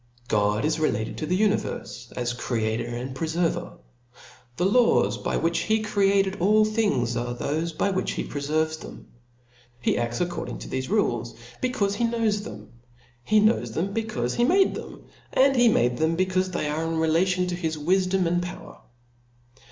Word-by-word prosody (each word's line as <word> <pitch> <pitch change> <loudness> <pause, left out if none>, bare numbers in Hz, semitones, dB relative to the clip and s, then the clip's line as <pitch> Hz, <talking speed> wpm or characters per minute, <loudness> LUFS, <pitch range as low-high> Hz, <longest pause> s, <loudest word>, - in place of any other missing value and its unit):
God 105 +2 +1
is 160 +1 0
related 110 -8 -1
to 155 - -3
the 180 +3 +1
univerfe 210 -1 -1
as 120 -1 -2
creator 115 -2 -2
and 120 +2 -5
preferver; 165 +3 -1 0.8
the 175 - +1
laws 195 - +3
by - - -1
which 165 +1 +1
he 220 +1 +1
created 195 -2 +2
all 215 +4 +4
things, 205 - 0
are 120 +1 -2
thofe 155 +5 -2
by 200 - +1
which 190 0 -1
he - - -3
preferves 155 +2 -1
them. - - -11 0.7
He 120 - +1
adls 120 0 -2
according 175 0 -3
to - - -9
thefe 130 +2 -3
rules, 120 - 0 0.3
becaufe 210 -6 0
he 235 +3 0
knows 225 -3 0
them; 105 - -10 0.5
he 215 - +3
knows 215 +2 +2
them, 195 +5 -2
becaufe 200 - -2
he 240 - +3
made 380 +9 +4
them; - - -8 0.3
and 270 +1 +4
he 245 -1 +5
made 120 - +2
them, 160 +3 +1
becaufe 185 0 +1
they 175 -4 -2
are 155 +2 -1
relative 165 +3 +1
to 175 - -2
his 160 -3 -2
wifdom 185 +4 +1
and 175 +1 +1
power. 175 0 -8
170 Hz, 165 wpm, -25 LUFS, 130-200 Hz, 0.8 s, he